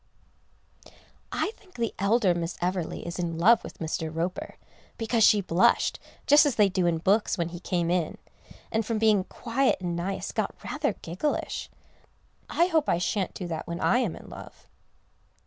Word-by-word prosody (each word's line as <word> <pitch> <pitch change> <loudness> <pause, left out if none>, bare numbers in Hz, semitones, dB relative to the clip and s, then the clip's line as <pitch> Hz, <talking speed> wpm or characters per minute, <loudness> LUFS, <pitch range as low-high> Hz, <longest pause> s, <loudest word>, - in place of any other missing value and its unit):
I 410 - -1
think 370 -3 -23
the 235 -2 -2
elder 200 -1 +3
Miss 170 0 -3
Everleigh 180 -1 -2
is 170 +2 -5
in 170 -2 -2
love 215 +7 +5
with - - -9
Mr. 160 0 -3
Roper, 170 +3 -3 0.4
because 225 -1 +1
she 205 0 +6
blushed, 180 -1 +2 0.3
just 290 +1 +7
as 290 -5 +1
they 205 -2 +4
do 185 -2 +1
in 170 -1 +2
books, 200 +6 +2
when 170 -1 -1
he 175 0 -8
came 175 -1 -1
in, 175 -3 0 0.5
and 220 0 +1
from 225 +1 -2
being 215 -3 +3
quiet 255 +3 0
and 175 -2 -3
nice, 185 +3 -3
got - - -2
rather 295 -7 -1
gigglish. 185 - -3 0.8
I 345 - +3
hope 320 -4 +1
I - - +3
shan't 185 +2 -1
do 185 - -5
that 160 -2 -4
when 170 0 -4
I 245 - +3
am 220 -10 -1
in - - -12
love. - - -11
190 Hz, 175 wpm, -27 LUFS, 170-230 Hz, 0.8 s, just